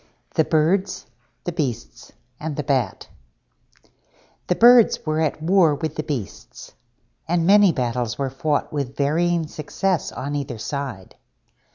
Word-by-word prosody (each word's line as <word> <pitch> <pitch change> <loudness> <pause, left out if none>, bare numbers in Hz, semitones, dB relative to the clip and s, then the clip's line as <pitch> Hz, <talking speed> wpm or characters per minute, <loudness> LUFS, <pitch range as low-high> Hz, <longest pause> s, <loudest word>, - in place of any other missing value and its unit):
THE 160 - +3
BIRDS, 170 +6 0 0.4
THE 175 - -3
BEASTS, 125 - -4 0.3
AND 155 -1 -4
THE 150 - -3
BAT 130 - -1 1.4
The 180 - +1
Birds 240 -3 +6
were 155 0 0
at 155 0 -1
war 170 -3 +4
with 155 0 -4
the - - -2
Beasts, 120 - -7 0.5
and 170 0 +1
many 200 0 +6
battles 120 -4 -2
were 135 -2 -2
fought 145 +3 -1
with 140 -2 -4
varying 165 +4 +1
success 165 +4 -2
on 140 +2 -5
either 140 -4 -4
side. 125 -6 -6
150 Hz, 135 wpm, -22 LUFS, 135-170 Hz, 1.4 s, Birds